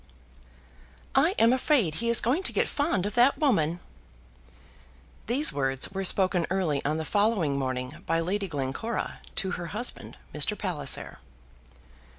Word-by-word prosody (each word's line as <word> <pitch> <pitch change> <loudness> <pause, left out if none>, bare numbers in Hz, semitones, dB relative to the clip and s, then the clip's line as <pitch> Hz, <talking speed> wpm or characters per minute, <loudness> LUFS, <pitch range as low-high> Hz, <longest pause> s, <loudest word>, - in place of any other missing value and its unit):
"I 315 +8 +3
am 230 +2 +5
afraid 255 - +2
he 235 - 0
is 235 - +5
going 260 - +1
to - - -7
get - - +1
fond 285 - 0
of 205 - -3
that 245 +4 +4
woman." 175 - +1 1.5
These 265 +7 +4
words 135 +1 0
were 195 0 -3
spoken 185 -2 +1
early 175 -7 -1
on 150 +2 -1
the 160 - -3
following 200 -8 +1
morning 130 +1 -3
by 165 +1 +1
Lady 195 +4 -2
Glencora 150 - -4 0.2
to 190 -2 -2
her 175 -1 -5
husband, 215 +8 -3 0.2
Mr. 150 +8 +2
Palliser. 150 -8 -3
190 Hz, 145 wpm, -27 LUFS, 150-235 Hz, 1.5 s, am